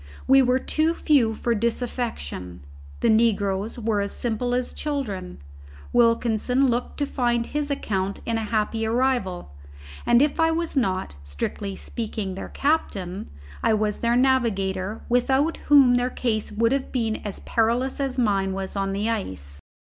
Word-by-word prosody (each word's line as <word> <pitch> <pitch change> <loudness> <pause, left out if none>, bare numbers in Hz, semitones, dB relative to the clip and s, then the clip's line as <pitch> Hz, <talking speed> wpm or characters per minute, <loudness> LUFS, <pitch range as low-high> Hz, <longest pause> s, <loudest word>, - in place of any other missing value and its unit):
We 270 +1 +6
were 250 0 +3
too 315 +5 0
few 250 -10 +3
for 235 +2 0
disaffection. 225 - -3 0.4
The - - +3
negroes 210 -2 +1
were 220 -3 0
as 200 - -2
simple 245 +1 -1
as 250 0 -2
children, 220 - -4 0.6
Wilkinson 240 +2 +3
looked 240 +1 -2
to 290 - 0
find 240 -3 0
his 295 +2 -3
account 200 -8 -2
in 230 - -1
a - - -3
happy 220 +1 -1
arrival, 225 - 0 0.5
and 240 0 +4
if 290 +3 +1
I 325 0 +4
was 330 0 -2
not, 190 - -1
strictly 70 - -4
speaking, 215 -4 -4
their 190 - -7
captain, 200 - -1 0.3
I 220 - +3
was 210 -1 -1
their 235 0 +1
navigator 215 -6 +1
without 265 +6 +2
whom 275 -4 +7
their 245 +1 +1
case 225 -4 -2
would 230 +2 +1
have 275 -1 -1
been 225 -4 0
as 205 -2 -6
perilous 235 +4 0
as 270 -2 -1
mine 195 -5 +1
was 190 +1 -5
on 195 0 -1
the 205 +3 -1
ice. 95 - -4
230 Hz, 155 wpm, -24 LUFS, 200-255 Hz, 0.6 s, whom